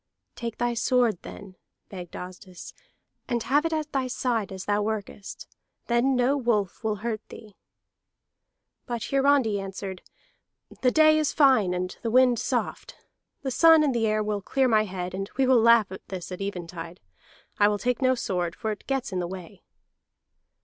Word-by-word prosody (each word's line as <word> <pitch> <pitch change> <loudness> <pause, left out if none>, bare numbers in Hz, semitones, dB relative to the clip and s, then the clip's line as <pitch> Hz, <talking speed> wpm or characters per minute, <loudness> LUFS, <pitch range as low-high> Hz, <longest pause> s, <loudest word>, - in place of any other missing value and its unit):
"Take 230 -2 -5
thy 240 0 0
sword, 235 -4 +1
then," 190 -2 -11 0.3
begged 180 -3 -9
Asdis, 185 0 -9 0.5
"and 240 -3 -1
have 295 +4 +2
it - - -6
at 310 -1 -2
thy 265 -2 -1
side 240 -5 -1
as 190 -1 -7
thou 205 0 +1
workest. 205 -1 -5 0.4
Then 240 +3 +2
no 250 +3 +2
wolf 230 -8 -1
will 215 -1 0
hurt 220 -2 -2
thee." 210 -3 -12 1.3
But 240 -2 -3
Hiarandi 275 -6 +3
answered, 195 -1 -6 0.8
"The 255 - +4
day 310 +2 +5
is 305 - 0
fine 255 -11 +4
and 180 0 -3
the 230 - -2
wind 250 0 +4
soft. - - -3 0.5
The 265 - -2
sun 325 +3 +6
and 285 -3 +1
the 225 -2 +1
air 215 0 +1
will 210 -1 -2
clear 265 +6 +1
my 215 -2 +3
head, 180 -2 -5
and 195 +2 -4
we 270 - +3
will 255 -2 +5
laugh 230 -3 +5
at 190 - -10
this 185 -1 -7
at 180 - -6
even 195 -3 -4
tide. 170 +1 -9 0.6
I 205 - +6
will 210 0 +1
take 250 +5 -1
no 260 0 +3
sword, 180 -7 -2
for 220 - -3
it 210 - -8
gets 270 -5 -2
in 185 - -2
the 175 - -2
way." 180 -2 -9
220 Hz, 175 wpm, -26 LUFS, 190-255 Hz, 1.3 s, sun